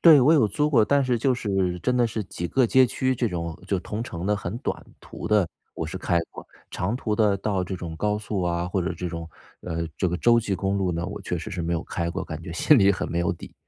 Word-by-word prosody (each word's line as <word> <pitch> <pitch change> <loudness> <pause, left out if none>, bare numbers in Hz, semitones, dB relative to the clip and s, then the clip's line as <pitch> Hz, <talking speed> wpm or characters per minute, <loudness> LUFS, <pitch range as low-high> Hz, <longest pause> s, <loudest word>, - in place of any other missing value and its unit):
对， 155 -5 +8
我 145 +6 +6
有 130 -10 +4
租 150 +9 +1
过， 120 -8 +5
但 140 +3 +3
是 125 -1 +1
就 130 +3 +2
是 95 -6 -1
真 125 +6 +1
的 120 - +4
是 110 -2 -3
几 85 -1 -5
个 130 -2 +3
街 130 +3 +6
区 130 +2 0
这 120 -1 0
种， 85 -3 -4
就 100 - +1
同 105 +5 -4
城 90 -6 -5
的 105 0 +2
很 95 +1 -4
短 - - -4 0.2
途 - - -7
的， 105 -5 +3 0.3
我 80 - -3
是 80 - -5
开 85 -2 +1
过。 - - -10 0.3
长 105 +7 -1
途 110 -4 -1
的 105 -2 +3
到 100 -2 -1
这 95 +1 -4
种 85 -2 -6
高 105 +4 0
速 105 -2 -3
啊， 85 0 0
或 90 +1 -1
者 85 - -1
这 90 +1 -4
种， 85 -1 -6 0.3
呃， 85 -1 -3
这 95 - +1
个 90 - -1
州 120 +5 +4
际 105 -4 -1
公 95 +2 -1
路 95 -2 0
呢， 85 0 -2
我 - - -6
确 90 - -2
实 110 - -6
是 90 -3 -3
没 85 +1 -1
有 85 - -1
开 85 -1 -2
过， 95 +1 -4
感 80 0 -7
觉 85 0 -7
心 145 - +5
里 100 -2 +6
很 95 - -1
没 85 - -1
有 85 - +1
底。 85 - -11
95 Hz, 295 characters per minute, -25 LUFS, 85-115 Hz, 0.3 s, 对